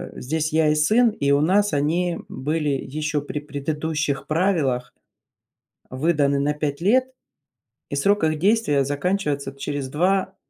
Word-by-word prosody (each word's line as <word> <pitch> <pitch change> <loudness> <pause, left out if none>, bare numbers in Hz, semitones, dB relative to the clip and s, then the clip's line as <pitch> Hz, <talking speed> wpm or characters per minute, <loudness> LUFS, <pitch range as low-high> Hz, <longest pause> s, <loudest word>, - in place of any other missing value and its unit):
здесь 155 +4 -2
я 160 -1 +3
и 150 - +2
сын, 220 +11 +4
и 140 -10 -1
у 140 0 +4
нас 200 +6 +2
они 165 +5 0
были 150 +3 -2
еще 150 +2 -2
при 145 +1 -5
предыдущих 150 0 -3
правилах 155 -8 0 1.0
выданы 140 0 +1
на 145 +1 0
5 145 -1 -3
лет. 255 +8 +2 0.8
И - - -3
срок 200 +7 +2
их 155 -1 +1
действия 190 -8 +2
заканчивается 145 -2 -2
через 140 -1 -4
2, 190 +6 0
150 Hz, 135 wpm, -23 LUFS, 140-180 Hz, 1.0 s, сын